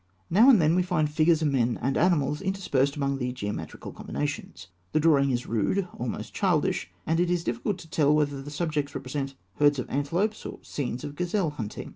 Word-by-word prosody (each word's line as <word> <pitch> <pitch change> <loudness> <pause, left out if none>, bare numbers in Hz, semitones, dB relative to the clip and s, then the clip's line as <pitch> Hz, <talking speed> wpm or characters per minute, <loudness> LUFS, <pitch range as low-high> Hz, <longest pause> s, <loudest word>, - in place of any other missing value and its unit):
Now 220 +9 +7
and 240 -7 +7
then 155 0 +4
we 180 - +3
find 175 -4 +1
figures 160 +1 +3
of 150 - +3
men 120 -3 +1
and 135 +2 0
animals 150 -4 +2
interspersed 160 -8 0
among 140 -2 -1
the 125 -1 -1
geometrical 105 -10 -5
combinations. 145 -10 -5 0.3
The - - +3
drawing 145 -3 +4
is 125 -1 -1
rude, 145 - 0
almost 120 0 -5
childish; - - +1 0.2
and 165 +1 +1
it 175 0 +2
is 175 -1 0
difficult 120 - -2
to 175 - -12
tell 150 -2 +2
whether 145 -2 0
the 140 - -8
subjects 150 -2 -2
represent 135 +1 -4 0.2
herds 145 -1 +4
of 125 - -3
antelopes 170 +10 -1
or - - -6
scenes 125 -3 -4
of 145 - -5
gazelle 180 0 0
hunting. 115 -8 -6
145 Hz, 195 wpm, -27 LUFS, 135-170 Hz, 0.3 s, Now